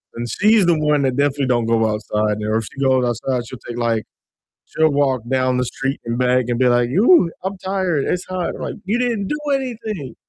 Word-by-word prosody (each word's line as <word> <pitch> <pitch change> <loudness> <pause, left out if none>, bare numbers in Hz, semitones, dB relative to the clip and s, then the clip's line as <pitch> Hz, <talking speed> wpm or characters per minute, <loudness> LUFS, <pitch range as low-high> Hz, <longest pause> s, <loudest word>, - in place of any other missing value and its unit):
and 120 +1 -4
she's 210 - +3
the 170 -2 +3
one 150 -2 +2
that 130 -2 0
definitely 140 -1 +1
don't 120 -2 +1
go 115 -1 +2
outside, 105 0 -1
and 105 +1 -1
if 115 - -2
she 135 - -11
goes 130 -1 +3
outside 120 +1 -1
she'll 130 -1 -9
take, 120 0 -6
like 115 -2 0 0.6
she'll 160 -1 +1
walk 140 -4 +1
down 130 -1 +1
the 125 - 0
street 135 +3 -3
and 115 +1 -2
back 125 -1 +2
and 120 - 0
be 130 - +4
like, 120 0 +2
"Ooh, 205 - +5
I'm 195 +1 -3
tired, 185 -6 -1
it's 180 0 -2
hot," 185 -2 -3
I'm - - -9
like, - - -4
"You 215 +5 0
didn't 230 -6 -1
do 300 - -2 0.2
anything!" 220 - -5
135 Hz, 220 wpm, -20 LUFS, 120-185 Hz, 0.6 s, Ooh